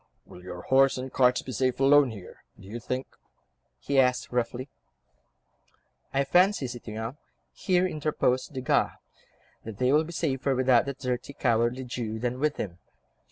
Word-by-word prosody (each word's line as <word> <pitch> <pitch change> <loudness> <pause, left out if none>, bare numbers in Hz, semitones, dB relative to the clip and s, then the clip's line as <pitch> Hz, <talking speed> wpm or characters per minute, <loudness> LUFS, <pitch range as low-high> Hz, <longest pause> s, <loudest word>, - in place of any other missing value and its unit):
"Will 90 - -13
your 90 -1 -8
horse 135 0 +4
and 130 +1 -6
cart 125 -1 +4
be 130 - -5
safe 130 +1 0
alone, 140 0 +5
here, 100 -5 -11 0.2
do - - -14
you 115 +4 -6
think?" 130 +3 -3 0.7
he 140 - 0
asked 125 -1 +2
roughly. 125 +1 -2 1.4
"I 135 +1 +1
fancy, 180 +2 +3
citoyen," 115 0 -6 0.4
here 180 -1 +1
interposed 150 -6 0
Desgas, 130 -1 +1 0.7
"that 110 -2 -8
they 125 +2 +2
will 155 +2 +4
be 165 - -8
safer 135 -5 -1
without 130 -1 +3
that 140 -1 -4
dirty, 125 +1 -3
cowardly 120 0 +1
Jew 120 -3 -4
than 120 +2 -3
with 150 +1 0
him. 90 -3 -5
130 Hz, 155 wpm, -27 LUFS, 120-140 Hz, 1.4 s, alone